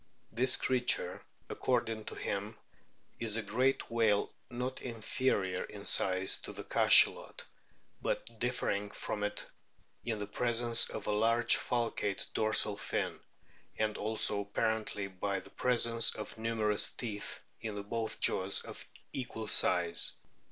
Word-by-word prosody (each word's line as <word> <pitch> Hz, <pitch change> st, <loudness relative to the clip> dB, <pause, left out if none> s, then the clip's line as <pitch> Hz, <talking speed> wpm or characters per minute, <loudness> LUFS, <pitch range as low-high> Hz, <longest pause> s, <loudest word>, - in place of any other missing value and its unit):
This 125 Hz, +3 st, +2 dB
creature, 125 Hz, -8 st, +1 dB, 0.2 s
according 115 Hz, -3 st, -1 dB
to -, -, -5 dB
him, 100 Hz, +2 st, -3 dB, 0.6 s
is 115 Hz, -2 st, 0 dB
a 115 Hz, -, -1 dB
great 125 Hz, +6 st, +1 dB
whale 110 Hz, -3 st, +2 dB, 0.2 s
not 125 Hz, +2 st, -4 dB
inferior 110 Hz, -5 st, 0 dB
in 100 Hz, -1 st, -10 dB
size 95 Hz, -1 st, +2 dB
to -, -, -8 dB
the -, -, -7 dB
Cachalot, -, -, +4 dB, 0.6 s
but 115 Hz, -1 st, -3 dB
differing 115 Hz, -4 st, -1 dB
from 105 Hz, 0 st, -4 dB
it 105 Hz, 0 st, -1 dB, 0.6 s
in 115 Hz, -2 st, -2 dB
the 105 Hz, -, -3 dB
presence 115 Hz, +2 st, +2 dB
of 110 Hz, -, -6 dB
a -, -, 0 dB
large 115 Hz, +3 st, +3 dB
falcate 115 Hz, -5 st, -1 dB
dorsal 110 Hz, -1 st, +3 dB
fin, -, -, -2 dB, 0.6 s
and 110 Hz, -1 st, 0 dB
also 105 Hz, -1 st, +1 dB
apparently 105 Hz, 0 st, -1 dB
by 95 Hz, +1 st, -2 dB
the -, -, -14 dB
presence 115 Hz, -2 st, +3 dB
of 105 Hz, -, -6 dB
numerous 110 Hz, -2 st, +1 dB
teeth 105 Hz, -4 st, -5 dB, 0.2 s
in 105 Hz, -2 st, -4 dB
both 110 Hz, +2 st, -3 dB
jaws 95 Hz, +1 st, +2 dB
of -, -, -8 dB, 0.3 s
equal 115 Hz, -4 st, -4 dB
size. 85 Hz, -4 st, +1 dB
110 Hz, 130 wpm, -33 LUFS, 105-115 Hz, 0.6 s, Cachalot